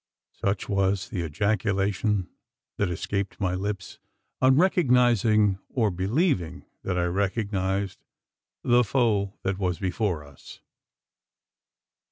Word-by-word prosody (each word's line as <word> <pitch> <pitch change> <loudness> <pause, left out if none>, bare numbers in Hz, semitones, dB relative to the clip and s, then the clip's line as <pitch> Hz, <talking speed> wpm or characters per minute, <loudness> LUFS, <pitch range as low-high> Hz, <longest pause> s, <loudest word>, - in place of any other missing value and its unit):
Such 100 0 -2
was 100 -1 0
the 90 - -3
ejaculation 100 - 0 0.5
that 105 - 0
escaped 100 +3 -3
my 95 -3 0
lips, 100 +1 -4 0.4
on 130 0 +5
recognising, 120 - +3
or 110 -5 +1
believing 95 - 0 0.2
that 90 -1 -2
I 90 - +1
recognised, 95 0 -1 0.6
the 120 0 +4
foe 105 -5 +1
that 95 0 -1
was 90 -3 0
before 90 -3 -1
us. 70 -1 -14
100 Hz, 105 wpm, -26 LUFS, 95-110 Hz, 0.6 s, on